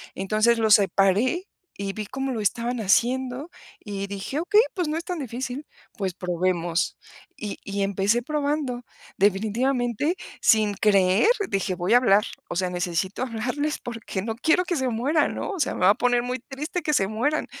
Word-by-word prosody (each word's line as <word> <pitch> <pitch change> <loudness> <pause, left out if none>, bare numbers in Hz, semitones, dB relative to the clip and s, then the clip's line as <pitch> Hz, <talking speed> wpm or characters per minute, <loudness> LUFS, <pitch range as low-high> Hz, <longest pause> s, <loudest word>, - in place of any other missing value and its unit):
entonces, 215 +4 +2
los 220 -1 +6
separé 205 - +2 0.3
y 200 0 -3
vi 215 0 -5
cómo 270 +2 -3
lo 230 - -3
estaban 235 +4 -1
haciendo 250 - +1 0.3
y 200 -1 -5
dije: 200 +9 -4
"Okey, 415 +5 +5
pues 355 -4 -1
no 305 - -1
es 335 - -4
tan 360 -3 -3
difícil, 260 +2 -5 0.3
pues 190 -3 -2
probemos". 175 0 -1 0.4
Y 210 -2 -5
y 200 0 -3
empecé 200 +4 +1
probando. 285 -4 -2 0.3
Definitivamente, 235 - +1 0.3
sin 215 -2 +4
creer, 195 - +4 0.2
dije: 195 -1 -1
"Voy 175 +4 0
a - - +9
hablar, 210 -4 +4 0.3
o - - -4
sea, 185 +1 0
necesito 180 +5 -2
hablarles 255 +6 -2
porque 230 -5 -5
no 220 +2 -3
quiero 320 +8 +3
que 350 -2 -1
se 260 -1 0
mueran", 275 +7 +1
¿no?, - - -4
o 385 - -5
sea, - - +1
"Me - - -6
va 185 - +6
a - - +1
poner 245 0 +2
muy 250 0 -3
triste 295 +8 -5
que 300 - 0
se 195 -9 +3
mueran, 250 +9 0
230 Hz, 175 wpm, -25 LUFS, 195-270 Hz, 0.4 s, a